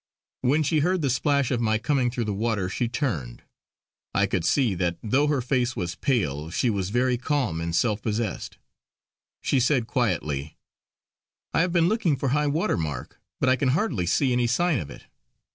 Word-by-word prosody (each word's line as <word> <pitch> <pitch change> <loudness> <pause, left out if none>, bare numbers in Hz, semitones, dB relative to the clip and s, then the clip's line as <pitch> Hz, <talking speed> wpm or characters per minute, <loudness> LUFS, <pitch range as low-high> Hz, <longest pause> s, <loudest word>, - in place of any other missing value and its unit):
When 145 +5 +2
she 155 +1 +2
heard 180 +2 +1
the 135 - +2
splash 140 +1 +1
of 120 -2 0
my 110 -1 +2
coming 130 +1 +1
through 120 -1 -2
the 105 -2 -2
water, 105 -3 -1
she 120 +6 -1
turned; 110 - -3 0.7
I 100 - +4
could 95 -3 -1
see 115 - +2
that 85 -1 -1
though 135 +7 +2
her 145 -3 +1
face 125 0 0
was 90 -6 -3
pale 80 - -1
she 115 +8 +1
was 95 -3 -2
very 125 +2 +1
calm 130 - -1
and 85 0 -2
self 105 +2 +1
possessed. 110 -2 -3 0.8
She 135 - +1
said 130 -1 +2
quietly: 75 - -1 1.0
"I - - +3
have 180 0 +1
been 170 -1 +3
looking 190 -7 +1
for 135 0 -1
high 150 +3 +1
water 155 +4 0
mark, 80 -4 -5 0.2
but - - +1
I 130 - +5
can 130 0 0
hardly 120 - -1
see 130 - +2
any 120 -1 +2
sign 160 +6 +2
of 75 -5 -6
it. - - -11
120 Hz, 190 wpm, -25 LUFS, 95-140 Hz, 1.0 s, I